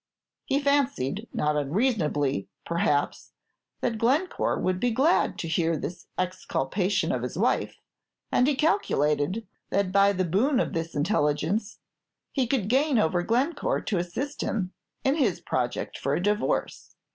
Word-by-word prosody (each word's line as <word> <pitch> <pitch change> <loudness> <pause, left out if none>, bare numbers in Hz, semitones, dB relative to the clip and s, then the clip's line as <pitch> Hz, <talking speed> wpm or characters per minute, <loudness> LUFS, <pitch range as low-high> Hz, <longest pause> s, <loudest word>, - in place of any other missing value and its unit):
He 275 +1 +1
fancied, 270 - 0
not 150 0 0
unreasonably, 150 - 0 0.2
perhaps, 150 -4 0 0.5
that 230 -3 -1
Glencore 280 +11 +1
would 185 0 0
be 245 - +2
glad 270 +9 +2
to 165 - -4
hear 165 0 +1
this 175 +4 -6
exculpation 185 0 -1
of - - -1
his - - -4
wife; - - +1 0.6
and 250 - +3
he 290 - +2
calculated 200 - +1 0.2
that 195 -1 +1
by 200 +1 +5
the 185 -1 0
boon 240 - +2
of - - -1
this 165 0 -3
intelligence 160 +5 0 0.5
he 260 -4 0
could 230 -6 0
gain 270 +3 +3
over 175 -3 +2
Glencore 275 - 0
to 195 - -1
assist 260 +12 -4
him 190 -4 -2 0.3
in 270 - +3
his 230 - +1
project 125 -1 -2
for 140 +1 0
a 175 - -2
divorce. 210 +2 -1
200 Hz, 145 wpm, -27 LUFS, 165-255 Hz, 0.6 s, by